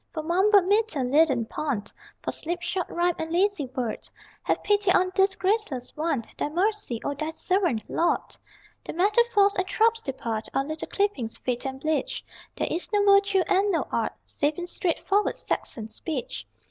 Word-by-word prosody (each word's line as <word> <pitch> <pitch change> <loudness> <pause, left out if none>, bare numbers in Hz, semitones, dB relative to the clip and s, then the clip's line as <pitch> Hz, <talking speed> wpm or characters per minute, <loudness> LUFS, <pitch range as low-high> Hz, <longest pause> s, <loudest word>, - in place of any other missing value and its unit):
For 310 - -2
mumbled 380 +4 +4
meter, 405 - +2
leaden 270 -2 +3
pun, 255 -3 -2 0.4
For - - -1
slipshod 345 +2 -2
rhyme, 350 +1 +1
and 320 0 -3
lazy 360 -4 +2
word, 250 -3 -4 0.3
Have - - -1
pity 410 -2 +2
on 370 0 +3
this 385 0 +3
graceless 380 - -1
one 305 -6 -1 0.2
Thy - - 0
mercy 365 - 0
on 285 -1 -2
Thy 310 +2 -2
servant, 340 - 0
Lord! 340 - 0 0.5
The - - -6
metaphors 410 +2 +4
and 370 -1 -1
tropes 455 +3 +2
depart, 230 - -4
Our 270 - +1
little 310 +2 -5
clippings 395 - -1
fade 250 +1 -2
and 265 0 -5
bleach: 310 - -1 0.3
There - - 0
is 350 - -3
no 415 -1 +3
virtue 395 -1 +5
and 390 +2 +3
no 335 - 0
art - - 0
Save 290 +1 -1
in 355 - -3
straightforward 385 +3 0
Saxon 220 -3 -3
speech. 230 - -5
345 Hz, 165 wpm, -26 LUFS, 275-400 Hz, 0.5 s, virtue